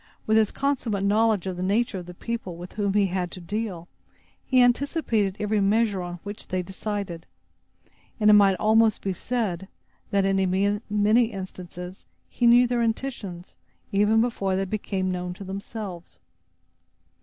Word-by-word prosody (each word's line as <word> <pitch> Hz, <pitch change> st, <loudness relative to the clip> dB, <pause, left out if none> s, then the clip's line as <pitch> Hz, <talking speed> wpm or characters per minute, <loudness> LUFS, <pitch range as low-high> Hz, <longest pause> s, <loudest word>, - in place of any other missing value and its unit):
With 220 Hz, -, +2 dB
his 220 Hz, -2 st, +4 dB
consummate 250 Hz, -8 st, -1 dB
knowledge 210 Hz, -1 st, +2 dB
of 185 Hz, -2 st, -3 dB
the -, -, -4 dB
nature 205 Hz, +2 st, 0 dB
of 175 Hz, -, -10 dB
the 180 Hz, -, -9 dB
people 205 Hz, -5 st, -5 dB
with 175 Hz, +1 st, -9 dB
whom 200 Hz, -2 st, -1 dB
he 205 Hz, -1 st, +4 dB
had 180 Hz, -1 st, -2 dB
to -, -, -7 dB
deal, 185 Hz, -1 st, -4 dB, 0.6 s
he 255 Hz, -, +2 dB
anticipated 245 Hz, -, +2 dB
every 210 Hz, 0 st, +1 dB
measure 205 Hz, -1 st, +2 dB
on 175 Hz, 0 st, -6 dB
which 205 Hz, +1 st, -8 dB
they 185 Hz, -1 st, -2 dB
decided; 190 Hz, -2 st, -5 dB, 0.9 s
and 210 Hz, -, +3 dB
it 210 Hz, -, +8 dB
might 200 Hz, -2 st, +6 dB
almost 220 Hz, +1 st, +3 dB
be 195 Hz, -, -1 dB
said, 190 Hz, -4 st, -2 dB, 0.4 s
that, 200 Hz, -1 st, +2 dB
in 195 Hz, +1 st, +1 dB
many 210 Hz, +3 st, +4 dB
instances, 185 Hz, -3 st, -8 dB, 0.2 s
he 240 Hz, -, +1 dB
knew 240 Hz, +1 st, +7 dB
their 240 Hz, -1 st, 0 dB
intentions, 220 Hz, -7 st, -4 dB, 0.3 s
even 210 Hz, +3 st, +3 dB
before 200 Hz, -5 st, 0 dB
they 195 Hz, +1 st, 0 dB
became 190 Hz, -2 st, -2 dB
known 180 Hz, 0 st, -4 dB
to 200 Hz, -, -9 dB
themselves. 195 Hz, -2 st, -7 dB
200 Hz, 155 wpm, -25 LUFS, 185-220 Hz, 0.9 s, it